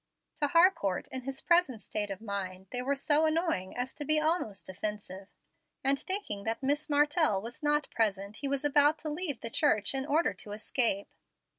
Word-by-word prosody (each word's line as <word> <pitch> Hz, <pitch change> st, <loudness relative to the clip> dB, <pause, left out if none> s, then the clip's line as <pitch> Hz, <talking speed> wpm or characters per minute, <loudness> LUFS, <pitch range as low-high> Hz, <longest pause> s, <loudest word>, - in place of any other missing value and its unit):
To 295 Hz, -, +1 dB
Harcourt, 335 Hz, -, +3 dB
in 260 Hz, -, -5 dB
his 270 Hz, 0 st, -5 dB
present 340 Hz, -9 st, +3 dB
state 205 Hz, 0 st, -3 dB
of 195 Hz, 0 st, -6 dB
mind, 190 Hz, -3 st, -5 dB
they 250 Hz, -, -1 dB
were 275 Hz, +3 st, 0 dB
so 295 Hz, +3 st, +3 dB
annoying 315 Hz, -, -1 dB
as 250 Hz, +1 st, -3 dB
to 295 Hz, -, -6 dB
be 310 Hz, +2 st, +3 dB
almost 305 Hz, -, -1 dB
offensive, 195 Hz, 0 st, -5 dB, 0.5 s
and, 275 Hz, +1 st, +3 dB
thinking 375 Hz, -, -2 dB
that 225 Hz, +4 st, -3 dB
Miss 290 Hz, +3 st, 0 dB
Martell 295 Hz, -, +3 dB
was 235 Hz, +8 st, -8 dB
not 295 Hz, 0 st, +1 dB
present, 205 Hz, -2 st, -1 dB
he 280 Hz, -, -3 dB
was 280 Hz, +1 st, -1 dB
about 290 Hz, +1 st, +4 dB
to 310 Hz, -, -3 dB
leave 300 Hz, -4 st, -3 dB
the 230 Hz, -, -5 dB
church 215 Hz, -8 st, +2 dB
in 270 Hz, +1 st, -2 dB
order 305 Hz, -6 st, +2 dB
to 205 Hz, +2 st, -7 dB
escape. 215 Hz, -1 st, +1 dB
270 Hz, 185 wpm, -30 LUFS, 210-300 Hz, 0.5 s, about